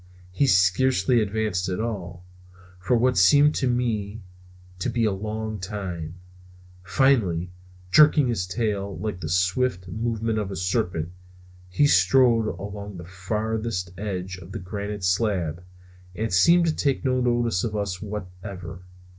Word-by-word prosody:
He 140 +10 +1
scarcely 105 +3 +3
advanced 105 -3 -1
at 90 - -2
all, 90 -6 -5 0.5
for 95 +7 +1
what 125 -2 +2
seemed 145 +11 +6
to 130 - 0
me 110 -4 -1 0.6
to - - -1
be 115 -2 0
a 105 - +2
long 110 +2 -4
time. 90 -4 -5 0.7
Finally, 90 -4 +2 0.4
jerking 150 - +6
his 105 -7 -1
tail 100 -1 -2
like 100 0 -4
the 80 -3 -5
swift 90 +3 0
movement 110 +2 -2
of 105 -2 -3
a 95 - -5
serpent, 90 -3 -1 0.6
he 120 +11 +2
strode 115 +1 +4
along 100 -1 -6
the 85 - -9
farthest 105 +1 -3
edge 95 -2 -4
of 90 +1 -11
the 110 - -4
granite 100 +2 -5
slab 90 -3 0 0.5
and 110 0 -2
seemed 170 - +5
to 160 -2 0
take 140 -1 0
no 130 -1 +1
notice 120 -6 +1
of 110 -2 -2
us 100 -3 -3
whatever. 95 -3 -7
100 Hz, 140 wpm, -24 LUFS, 90-115 Hz, 0.7 s, seemed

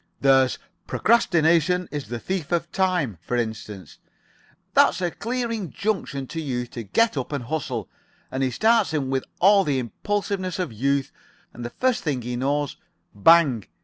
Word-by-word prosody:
"There's 135 -2 +4 0.3
'Procrastination 175 -5 +3
is 145 -6 -4
the 120 +2 -4
thief 180 +5 -4
of 170 0 -1
time,' 175 - 0
for 120 +7 -2
instance. 110 -4 -5 0.7
That's - - +4
a 175 -2 -1
clear 235 +4 -3
injunction 200 -8 -3
to 165 +5 -5
youth 125 -5 -3
to 120 - -6
get 220 - +1
up 130 - -3
and 140 -4 -3
hustle, 125 -5 -3 0.4
and 130 - -2
he 130 - +2
starts 220 - +2
in 135 -3 -1
with 130 -1 -1
all 195 +2 +6
the 145 -6 0
impulsiveness 185 - -2
of 180 -10 -3
youth, 135 +4 0 0.4
and 120 - -8
the 120 - -4
first 250 - 0
thing 135 -6 -1
he 125 +1 -3
knows 140 +3 -1 0.4
bang! 130 - +4
145 Hz, 160 wpm, -24 LUFS, 125-185 Hz, 0.7 s, all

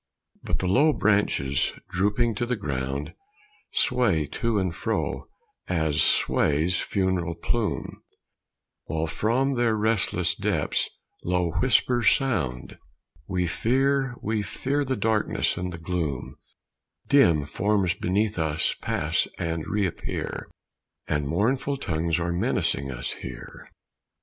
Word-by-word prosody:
But - - -1
the 95 - -2
low 145 +11 +4
branches, 100 - +1 0.2
drooping 105 +6 +1
to 120 +3 -2
the 125 - 0
ground, 70 - -3 0.6
Sway 95 -12 +3
to 115 -2 +1
and 90 -3 -1
fro, - - -2 0.4
as 80 -4 +1
sways 80 +5 +2
funereal 95 -4 -1
plume, 110 +5 -2 0.8
While 80 +1 -1
from 120 - +1
their 120 -3 +2
restless 100 -5 +2
depths - - 0 0.3
low 90 -1 0
whispers 125 -3 +4
sound: 70 - -1 0.5
"We 90 -2 0
fear, 135 +7 +1
we 110 0 0
fear 140 +7 -1
the 130 -1 -1
darkness 110 -3 +1
and 90 0 -3
the 85 - -6
gloom; 80 -5 -3 0.7
Dim 85 - +5
forms 100 +2 +1
beneath 100 +1 0
us 80 -1 +1
pass - - 0
and 85 -2 -3
reappear, 100 -5 -3 0.6
And 75 -1 0
mournful 130 - 0
tongues 85 - -1
are 85 0 -1
menacing 70 -5 0
us 60 -1 -3
here." 65 -2 -9
95 Hz, 115 wpm, -26 LUFS, 80-115 Hz, 0.8 s, Dim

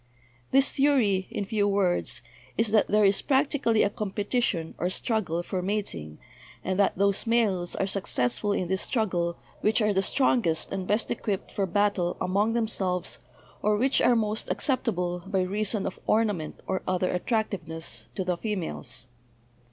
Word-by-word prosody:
This 270 +1 +4
theory, 245 -10 +2
in 205 - -3
few 205 -1 +1
words, 175 -12 0 0.3
is 225 -1 +2
that 215 -1 +4
there 210 0 +4
is 195 0 +3
practically 270 -5 +2
a - - +2
competition 205 -4 -1
or 175 - 0
struggle 185 -4 0
for 185 0 -3
mating, 180 - -3 0.5
and 185 +1 -1
that 200 - +3
those 200 +3 +1
males 205 -7 +1
are - - 0
successful 190 - 0
in 185 -3 0
this 190 +1 0
struggle 180 -7 -1 0.2
which 215 +2 +2
are 210 -2 +2
the 190 - +2
strongest 195 - +1
and 190 -1 -3
best 210 +2 0
equipped 205 -4 -3
for 195 -1 -1
battle 195 -2 +1
among 200 +5 +1
themselves, 195 -6 -1 0.4
or 210 0 +2
which 260 +5 +2
are 245 - +5
most 215 -1 -1
acceptable, 180 - -1
by 190 -1 +1
reason 205 +2 -1
of - - -4
ornament 210 -8 0
or 190 - -1
other 185 0 +1
at 180 - -3
tractiveness, 180 -8 -2
to 190 - -1
the 180 -1 -1
females. 170 - -3
200 Hz, 160 wpm, -27 LUFS, 180-220 Hz, 0.5 s, are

